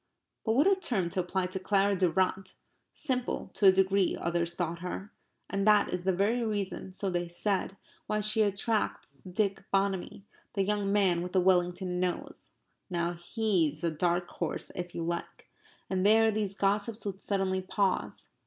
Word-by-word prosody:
But 220 - +1
what 275 +7 +4
a 395 - +6
term 245 - -1
to 185 - -1
apply 185 +1 0
to 185 +1 -4
Clara 200 +1 +2
Durrant! 185 +1 0 0.4
Simple 255 -4 -3
to 200 - +4
a - - +10
degree, 190 0 +2
others 170 0 -1
thought 170 -1 -3
her. 180 +3 -6 0.4
And 195 +1 -1
that 210 -1 +5
is 180 0 -3
the 190 - +4
very 210 +6 +1
reason, 205 -3 -3
so 190 +1 -3
they 175 0 -1
said, 195 +2 -1 0.3
why 210 - 0
she 215 +2 +2
attracts 205 - -1
Dick 195 0 0
Bonamy 195 -1 0 0.3
the 195 - +1
young 205 0 0
man 190 -4 +3
with 180 +1 -5
the 190 - +4
Wellington 180 0 +1
nose. 180 -1 -3 0.4
Now 170 -1 -1
HE'S 175 -4 0
a 170 - +1
dark 175 +2 0
horse 170 -2 -1
if 175 -1 -6
you 170 - -2
like. 170 +1 -5 0.4
And 185 -1 -1
there 220 +2 +5
these 205 -2 -2
gossips 205 +2 0
would 195 -1 -4
suddenly 190 -2 0
pause. 190 0 -1
190 Hz, 170 wpm, -30 LUFS, 180-205 Hz, 0.4 s, a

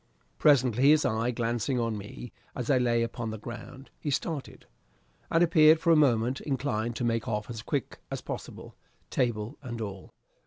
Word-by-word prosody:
Presently, 130 -2 +4
his 150 0 +5
eye 110 +2 +1
glancing 120 +1 -1
on 115 -2 -1
me 105 +4 -8 0.2
as 125 +1 -1
I 130 - +4
lay 120 -1 +2
upon 115 0 -4
the 110 - -5
ground, 120 +4 -9
he 150 - -3
started, 145 +1 -3 0.6
and 165 +1 +4
appeared 160 -2 +6
for 170 - +2
a - - +7
moment 125 -4 +2
inclined 120 -5 -2
to 125 - -3
make 115 -1 0
off 105 0 -2
as 115 -2 -6
quick 135 +2 -3
as - - -3
possible, - - -8 0.4
table 115 +1 -1
and 120 -4 -6
all. 100 -4 -6
120 Hz, 170 wpm, -28 LUFS, 115-140 Hz, 0.6 s, a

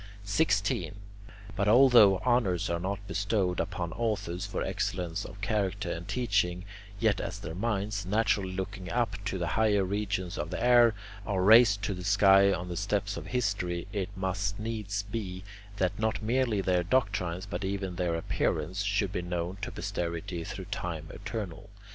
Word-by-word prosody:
16. 100 -2 +1 0.6
But 100 0 0
although 115 -4 +7
honours 115 -10 +2
are 85 - 0
not 100 +3 -4
bestowed 100 -2 0
upon 90 -4 -3
authors 100 -5 -2
for 100 - -3
excellence 90 -3 -2
of 100 - -10
character 100 -3 -1
and 85 +2 -5
teaching, 100 -5 0 0.3
yet 110 -3 +2
as - - -4
their 80 - -6
minds, 100 +1 -2
naturally 100 -1 +1
looking 95 0 -5
up 115 -4 -1
to 95 -1 -2
the 90 - -1
higher 105 -3 +2
regions 95 -2 -2
of 75 +1 -3
the - - -4
air, 120 -2 +5 0.3
are 95 -3 -1
raised 105 -1 +7
to 100 - -1
the 90 -1 -7
sky 100 0 +5
on 90 -1 -2
the 90 -1 -5
steps 100 0 -1
of - - -7
history, 100 -8 -1
it 100 -2 -2
must 100 +2 -2
needs 105 -2 -3
be, 100 -3 -5 0.3
that 95 +2 0
not 110 0 -1
merely 120 -2 +1
their 90 -2 +2
doctrines, 95 -4 0
but 100 - -5
even 95 -1 -3
their 85 -1 0
appearance, 90 +3 -1
should 100 -1 0
be 90 - -2
known 90 +1 -3
to - - -4
posterity 85 -1 -4
through - - -6
time 80 -2 -5
eternal. 100 -2 -6
100 Hz, 165 wpm, -29 LUFS, 90-105 Hz, 0.6 s, although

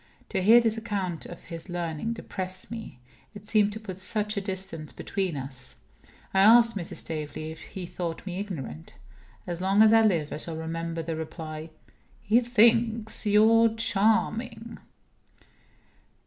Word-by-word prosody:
To - - -1
hear 225 +5 +8
this 225 -1 +1
account 195 -7 -3
of 175 - -10
his 165 +1 -8
learning 175 +4 -3
depressed 185 -4 -6
me. 220 - -7 0.4
It 205 0 -11
seemed 210 -2 +3
to 215 - -6
put 190 -4 -8
such 210 +2 -2
a 200 - -1
distance 190 -5 -5
between 185 -6 -3
us. 130 -1 -8 0.6
I 190 - +3
asked 230 +3 +7
Mrs. 175 -4 -5
Staveley 155 0 -5
if 160 - -11
he 190 -3 -7
thought 170 0 -5
me 185 -1 -4
ignorant. 135 - -6 0.5
As 175 0 -5
long 195 +3 +4
as 220 0 +6
I 225 - +7
live 170 -9 +1
I - - -3
shall 160 +1 0
remember 165 0 -4
the 165 0 -3
reply: 155 0 -6 0.5
"He 220 +4 +3
thinks 230 -2 +2
you 225 +2 +5
charming." 225 +2 0
195 Hz, 150 wpm, -27 LUFS, 165-220 Hz, 0.6 s, hear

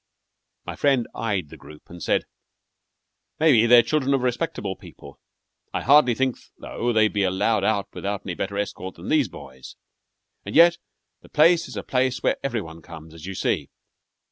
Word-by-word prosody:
My - - -6
friend 135 -5 +1
eyed 100 -9 -2
the - - -12
group, 75 0 -14
and 85 0 -12
said: - - +1 1.2
"Maybe 135 -8 +5
they're 120 0 +7
children 140 +2 +1
of 130 - -2
respectable 120 - -2
people. 70 -5 -14 0.6
I - - -2
hardly 135 -3 +5
think, 130 0 0 0.2
though, 120 +1 -3
they'd 110 -2 +2
be 105 - 0
allowed 95 +2 +1
out 100 -1 0
without 100 0 -4
any 90 - -3
better 100 +3 -4
escort 95 -2 -4
than 85 - -9
these 150 -6 +3
boys. 65 -5 -12 0.7
And - - -7
yet 170 +1 +6 0.4
the - - -18
place 165 +3 +4
is - - -9
a - - -4
place 130 -1 -1
where - - +1
every 120 -5 -1
one 80 0 -11
comes, 80 0 -12
as 80 +2 -10
you 95 - -6
see. - - -1
110 Hz, 175 wpm, -23 LUFS, 95-135 Hz, 1.2 s, they're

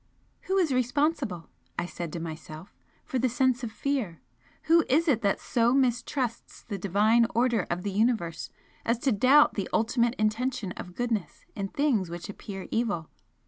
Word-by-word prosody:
"Who 385 - +1
is 335 -8 +2
responsible," 255 - 0 0.3
I - - -1
said 175 -2 -6
to 170 - -3
myself 160 +1 -8 0.3
"for 260 - -2
the 255 +1 +2
sense 255 0 +1
of 230 - -3
fear? 225 - -2 0.4
Who 330 +1 +5
is 315 +6 +3
it 250 -7 +3
that 200 -2 +1
so 240 +1 +2
mistrusts 250 -1 -1
the 200 -3 -5
Divine 215 +5 +3
order 235 -5 +2
of 175 +1 -2
the 200 - -2
Universe 210 -5 0 0.3
as 230 +1 +1
to 265 +3 +1
doubt 260 +8 +5
the 195 - -3
ultimate 235 +2 +1
intention 215 -1 -1
of 180 0 -8
goodness 230 -6 -3
in 200 -2 -2
things 230 - +1
which 175 +3 -7
appear 195 -1 -7
evil? 205 -9 -1
230 Hz, 165 wpm, -28 LUFS, 195-255 Hz, 0.4 s, Who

